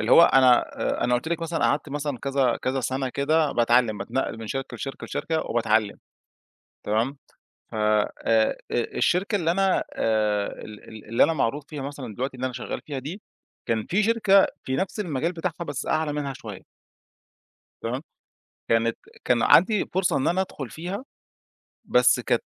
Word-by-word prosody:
اللي - - +1
هو - - +9
أنا 130 -5 +6 0.2
آآ، - - 0
أنا 125 0 +2
قُلت 125 +6 -1
لِك 170 0 -1
مثلًا 165 0 -2
قعدت 150 - +1
مثلًا 145 -2 -3
كذا 135 -2 +1
كذا 130 +1 0
سنة 130 +2 -2
كده، 150 +4 +1
باتعلّم، 120 -2 +3
باتنقل 110 +3 -2
من 115 - -7
شركة 135 +4 -4
لشركة، 135 - -6
لشركة 160 -1 -2
وباتعلّم 110 -2 +1 0.9
تمام، 115 +7 0 0.5
ف - - -12
آآ 105 -1 +2
آآ، 110 -1 +3 0.2
الشركة 180 - +1
اللي 165 -4 0
أنا، 190 +1 +2
آآ، 105 -2 +1 0.2
ال 110 0 -11
اللي 115 +2 +4
أنا - - +2
معروف 140 -1 -1
فيها 145 -3 -6
مثلًا 135 -5 -6
دلوقتي، 130 +3 -3
اللي 125 - -4
أنا 130 - -4
شغّال 125 - -5
فيها 145 -3 -4
دي، 160 +11 -7 0.4
كان 110 -2 -1
فيه 195 +4 +1
شركة 210 -3 +4 0.2
في 130 - -1
نفس 190 +7 -2
المجال 165 -3 -1
بتاعها 170 0 -4
بس 145 -3 -5
أعلى 155 -1 0
منها 145 -2 -3
شوية. - - -9 1.2
تمام؟ 125 +4 -3 0.7
كانت 115 0 +2 0.3
كان 120 -2 +3
عندي 200 +4 +5
فرصة 185 0 +2
إن 135 - 0
أنا 175 +3 +2
أدخل 140 -9 -6
فيها، 180 - -5 0.8
بس - - +4
كانت، - - 0
135 Hz, 170 wpm, -25 LUFS, 115-165 Hz, 1.2 s, هو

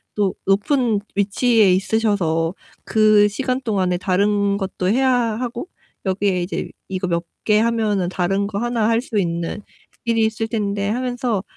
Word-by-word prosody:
또 200 -3 +1
높은 215 +2 +2
위치에 205 0 +3
있으셔서 190 -4 0 0.3
그 215 -1 +5
시간 255 +4 -2
동안에 190 -6 0
다른 200 +2 +1
것도 190 -2 -3
해야 260 +4 +3
하고 240 +4 -2 0.4
여기에 190 -1 0
이제 180 - -4 0.2
'이거 185 0 -2
몇 170 -1 -1 0.2
개 210 -1 +4
하면은 215 -5 +1
다른 195 +2 0
거 200 -1 -5
하나 235 -2 0
할 230 0 +2
수 220 -5 -1
있는 170 +2 -2 0.4
일이 225 -1 +2
있을 220 0 -2
텐데.' 205 -3 -1
하면서 245 -3 -1
205 Hz, 280 characters per minute, -20 LUFS, 190-230 Hz, 0.4 s, 그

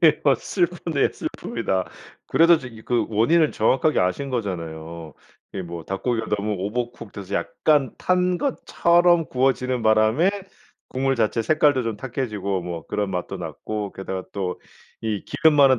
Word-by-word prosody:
네. 155 -3 +5
막 135 -4 +4
슬프네요. 175 -5 0
슬픕니다. 95 -1 -3 0.4
그래도 170 0 +5
저기 115 -5 -10
그 120 0 0
원인은 150 +9 +3
정확하게 130 +7 +2
아신 90 +10 0
거잖아요. 85 - -5
그 - - -14
이 95 - -2
뭐 85 -1 -7
닭고기가 115 +5 -2
너무 105 +1 -2
오버쿡 115 +2 -4
돼서 100 -1 -8
약간 145 -6 +1
탄 180 0 +1
것처럼 175 - +3
구워지는 130 -1 +1
바람에 110 - +4 0.6
국물 135 +1 0
자체 115 -1 +1
색깔도 145 -1 +3
좀 115 -2 -2
탁해지고 105 -6 -3
뭐 85 -2 -5
그런 105 -1 -1
맛도 90 -2 -3
났고 105 -2 -5
게다가 95 -1 -5
또 95 -2 -3 0.4
이 110 -3 -2
기름 160 -1 +3
많은 135 -3 +6
115 Hz, 320 characters per minute, -23 LUFS, 100-145 Hz, 0.6 s, 많은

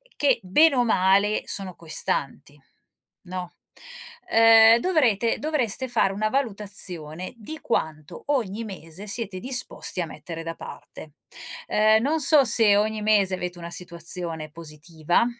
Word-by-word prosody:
che 275 -5 +2
bene 280 - +4
o 245 - +3
male 200 -1 +2
sono 190 -3 -5
costanti, 145 -3 -4 0.6
no, 180 -1 -6 0.8
ehm, 225 0 +7
dovrete 235 - +1
dovreste 265 -5 -2
fare 205 -5 +1
una 215 +2 -1
valutazione 195 - -4
di 275 +8 -9
quanto 155 -8 -3
ogni 230 -6 -1
mese 190 -3 -9
siete 205 -3 -3
disposti 250 -4 -4
a - - -2
mettere 165 +1 -8
da 165 0 -5
parte. 155 -2 -11 0.5
Ehm, 215 +1 +4
non 305 +5 0
so 290 -1 +5
se 220 -3 +4
ogni 215 +1 0
mese 205 -3 +2
avete 180 -1 -5
una 170 0 -8
situazione 170 -2 -6
positiva, 160 +3 -2
200 Hz, 130 wpm, -24 LUFS, 170-230 Hz, 0.8 s, ehm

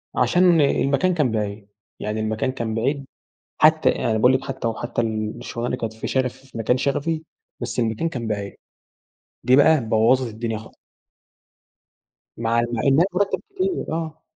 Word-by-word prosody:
عشان 175 -2 +4
المكان 140 +5 +2
كان 150 -8 +1
بعيد. 105 -1 -3 0.3
يعني 105 +1 -3
المكان 110 +3 -1
كان 115 -4 -3
بعيد 135 +5 -1 0.6
حتّى - - +5 0.2
أنا 110 -1 +2
باقول 125 +4 +5
لِك 130 - 0
حتى - - -3
وحتى 115 +1 -2
الشغلانة 110 +1 -3
اللي 125 - -2
كانت 115 -2 -4
في 110 - -6
شغف 130 -2 0
في 130 -2 -13
مكان 115 +3 +1
شغفي، 145 +4 -1 0.4
بس 120 0 -3
المكان 115 +7 0
كان 120 -7 -5
بعيد. 100 -2 -3 0.9
دي 130 - +5
بقى 145 -2 +5
بوَّظت 115 +3 +3
الدنيا 115 -1 -3
خا 110 - -12 1.7
مع 115 0 +1
مع 115 - -1
إنها 140 +5 +4
المرتب 195 +2 0
كتير 375 -1 -1
آه. 160 -1 -4
125 Hz, 155 wpm, -22 LUFS, 110-145 Hz, 1.7 s, حتّى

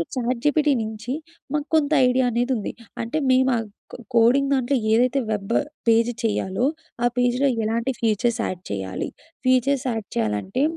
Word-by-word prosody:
ChatGPT 270 +4 +1
నుంచి, 220 +3 -5 0.4
మాకు 295 0 -1
కొంత 305 -2 +2 0.2
ఐడియా 255 +1 +2
అనేది 240 +3 0
ఉంది. 210 - -3 0.3
అంటే, 235 +6 -2
మేము 260 0 +4
ఆ - - 0 0.3
కో - - -8 0.2
కోడింగ్ 250 +5 +4
దాంట్లో 265 +1 +1 0.2
ఏదైతే 250 +4 +3
వెబ్, 205 +1 -2 0.3
పేజ్ 230 +1 +4
చేయాలో, 210 0 0 0.4
ఆ - - +4
పేజ్‌లో 245 +3 +2 0.2
ఎలాంటి 230 +4 0
ఫీచర్స్ 230 +1 +1
యాడ్ 180 -1 -4
చేయాలి. 95 -2 -3 0.4
ఫీచర్స్ 255 +1 +2
యాడ్ 225 -3 -4
చేయాలంటే, 115 - -1
240 Hz, 145 wpm, -23 LUFS, 220-260 Hz, 0.4 s, మేము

